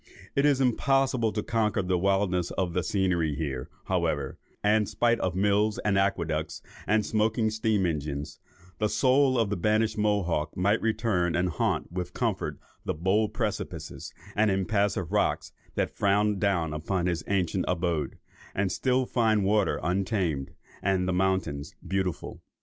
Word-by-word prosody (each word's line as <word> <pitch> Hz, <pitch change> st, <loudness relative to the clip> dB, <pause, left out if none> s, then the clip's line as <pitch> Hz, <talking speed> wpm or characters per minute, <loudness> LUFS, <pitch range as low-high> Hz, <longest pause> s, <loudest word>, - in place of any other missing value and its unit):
It 140 Hz, +1 st, +4 dB
is 140 Hz, -2 st, +3 dB
impossible 130 Hz, -2 st, +2 dB
to 105 Hz, -, -2 dB
conquer 105 Hz, -3 st, 0 dB
the 90 Hz, 0 st, +1 dB
wildness 95 Hz, -1 st, +1 dB
of 90 Hz, -3 st, -2 dB
the 90 Hz, -, +1 dB
scenery 85 Hz, -5 st, 0 dB
here, 70 Hz, -5 st, -4 dB, 0.2 s
however; 80 Hz, -7 st, -1 dB, 0.2 s
and 105 Hz, 0 st, +3 dB
spite 115 Hz, +2 st, +2 dB
of 90 Hz, -2 st, -1 dB
mills 105 Hz, +2 st, +2 dB
and 105 Hz, -2 st, +2 dB
aqueducts, 85 Hz, -5 st, -1 dB, 0.2 s
and 105 Hz, 0 st, +2 dB
smoking 110 Hz, +1 st, +1 dB
steam 110 Hz, -3 st, +1 dB
engines, 75 Hz, -2 st, -3 dB, 0.4 s
the 105 Hz, -1 st, +1 dB
soul 130 Hz, +4 st, +3 dB
of 110 Hz, -3 st, +1 dB
the -, -, +1 dB
banished 110 Hz, +4 st, +1 dB
Mohawk 90 Hz, -8 st, 0 dB
might 100 Hz, +4 st, +2 dB
return 105 Hz, -6 st, +1 dB
and 90 Hz, +1 st, +1 dB
haunt 85 Hz, -, -1 dB
with 90 Hz, 0 st, -5 dB
comfort -, -, -1 dB, 0.3 s
the -, -, -2 dB
bold 95 Hz, +6 st, +1 dB
precipices -, -, -4 dB, 0.2 s
and 110 Hz, +1 st, +3 dB
impassive 95 Hz, -2 st, 0 dB
rocks 105 Hz, 0 st, 0 dB, 0.2 s
that -, -, -1 dB
frown 100 Hz, 0 st, +2 dB
down 85 Hz, -6 st, +1 dB
upon 85 Hz, +4 st, -1 dB
his 90 Hz, -2 st, -1 dB
ancient 95 Hz, -2 st, 0 dB
abode, 85 Hz, -3 st, -1 dB, 0.4 s
and 95 Hz, -1 st, 0 dB
still 130 Hz, +5 st, +1 dB
find 110 Hz, -4 st, +2 dB
the -, -, +1 dB
water 105 Hz, -1 st, +2 dB
untamed, 90 Hz, -, 0 dB, 0.3 s
and 95 Hz, -1 st, +1 dB
the 95 Hz, -, +1 dB
mountains 90 Hz, -6 st, -1 dB
beautiful. 95 Hz, -3 st, -2 dB
95 Hz, 150 wpm, -27 LUFS, 90-110 Hz, 0.4 s, It